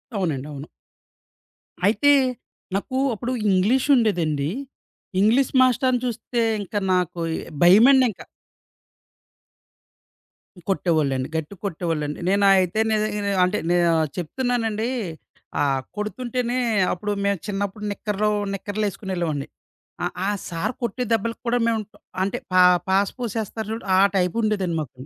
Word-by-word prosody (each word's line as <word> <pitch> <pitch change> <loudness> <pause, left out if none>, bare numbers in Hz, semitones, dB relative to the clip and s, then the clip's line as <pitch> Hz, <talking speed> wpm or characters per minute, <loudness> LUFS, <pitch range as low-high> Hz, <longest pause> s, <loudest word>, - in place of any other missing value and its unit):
అవునండి. 150 -8 -2
అవును. 140 +1 -8 1.2
అయితే 285 +8 +4 0.6
నాకు 260 +6 -2 0.2
అప్పుడు 240 +4 -4 0.2
ఇంగ్లీష్ 225 +10 +2
ఉండేదండి. 160 - +1 0.7
ఇంగ్లీష్ 235 +6 +3
మాస్టరుని 255 0 +3
చూస్తే 240 0 -2 0.2
ఇంకా 205 +2 -3
నాకు 180 -1 0 0.4
భయమండింక. 235 +4 +6 2.5
కొట్టేవాళ్ళండి. 155 -8 +1
గట్టిగా 160 +4 -4
కొట్టేవాళ్ళండి. 160 -5 -2
నేను 200 +1 +3
అయితే 185 +2 +2
నేను 210 -1 0
అంటే 185 +3 +1
నేను 175 -1 +3 0.3
చెప్తున్నానండి, 225 - -1 0.7
ఆ - - +4 0.3
కొడుతుంటేనే, 245 +3 -2 0.4
అప్పుడు 205 +3 -3
మేము 200 -3 +1
చిన్నప్పుడు 200 +1 -3
నిక్కర్లు 210 +1 -1 0.2
నిక్కర్లేసుకొనెళ్ళేవాడిని. 190 -7 -3 0.6
ఆ! - - +1 0.2
ఆ - - +2 0.2
సారు 165 +8 -2
కొట్టే 235 +2 -2
దెబ్బలకి 225 +1 -1
కూడా 245 +1 +2
మేము 225 -1 +1 0.4
అంటే 195 - -2 0.2
పా 185 - +6 0.3
పాసు 195 +1 +2
పోసేస్తారు 220 -2 -4
చూడు, 225 - -5
ఆ - - +5 0.2
టైపుండేదండి 190 -1 0
మాకు. 130 -3 -9
205 Hz, 105 wpm, -23 LUFS, 175-230 Hz, 2.5 s, భయమండింక